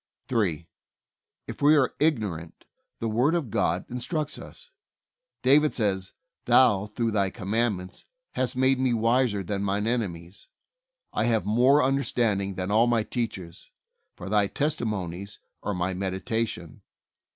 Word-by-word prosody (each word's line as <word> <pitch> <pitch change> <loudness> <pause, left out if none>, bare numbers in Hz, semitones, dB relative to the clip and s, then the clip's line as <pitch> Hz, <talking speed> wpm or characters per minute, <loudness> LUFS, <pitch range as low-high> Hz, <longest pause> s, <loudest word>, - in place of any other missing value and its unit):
3. 90 -9 0 0.8
If - - -8
we 150 +2 +6
are 130 -3 +2
ignorant, 105 - -1 0.3
the 115 - -2
Word 125 +9 +2
of 145 -11 -2
God - - 0
instructs 145 +5 -3
us. - - -12 0.7
David 150 +3 +4
says, 95 -4 -1 0.3
"Thou 105 -6 +4
through 115 +2 -2
Thy 100 -2 +1
commandments 100 -2 -2 0.2
hast 125 -1 -2
made 130 0 +2
me 130 -2 +2
wiser 115 -2 +1
than 100 +2 -3
my 100 0 0
enemies. 100 -5 -3 0.7
I - - +1
have 110 -5 +1
more 125 +7 +4
understand 125 -6 +1
ing 100 -1 -4
than 95 +2 -3
all 115 +3 +4
my 115 -2 +2
teachers; 95 -8 -5 0.5
for - - -9
Thy 105 0 +2
testimon 110 - -2
ies 100 +1 -9 0.2
are 105 - -3
my 90 +1 -1
meditation. 95 -1 -3
110 Hz, 140 wpm, -26 LUFS, 95-125 Hz, 0.8 s, we